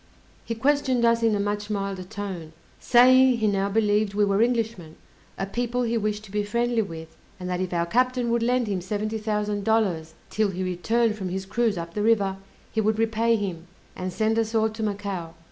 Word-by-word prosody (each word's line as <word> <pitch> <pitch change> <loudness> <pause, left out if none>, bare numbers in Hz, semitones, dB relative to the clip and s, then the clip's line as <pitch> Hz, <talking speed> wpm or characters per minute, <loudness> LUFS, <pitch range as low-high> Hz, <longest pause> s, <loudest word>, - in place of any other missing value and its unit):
He 230 - -4
questioned 260 -1 +2
us 230 0 +3
in 225 -2 +3
a - - -1
much 205 +1 -2
milder 195 -2 -2
tone, 185 -5 -6 0.3
saying, 255 +1 +6
he 220 - 0
now 200 -1 +1
believed 210 -1 +1
we 210 0 +3
were 200 +1 +2
Englishmen, 225 -9 -1 0.4
a 195 - -2
people 245 +4 -2
he 235 0 0
wished 215 -1 -1
to 205 - -13
be 210 +1 0
friendly 235 +3 0
with; 160 -5 -8 0.2
and 180 - -5
that 180 0 -2
if 185 - -3
our 170 -1 0
captain 250 +4 +1
would 235 0 +1
lend 245 +1 +2
him 195 -4 -2
seventy 215 +4 -3
thousand 210 -1 -1
dollars 185 -8 0 0.2
'till 215 -1 +1
he 185 0 -3
returned 215 +5 +1
from 190 -2 -3
his 190 +1 -4
cruise 220 0 0
up 170 0 -6
the 210 - -2
river, 205 -3 +2 0.3
he 220 - 0
would 215 0 +1
repay 225 +1 +2
him, 185 -5 -4 0.3
and 185 0 -4
send 220 +3 +1
us 225 0 -1
all 220 0 +3
to 220 +1 -7
Macao. 200 -5 -3
210 Hz, 205 wpm, -25 LUFS, 195-230 Hz, 0.4 s, saying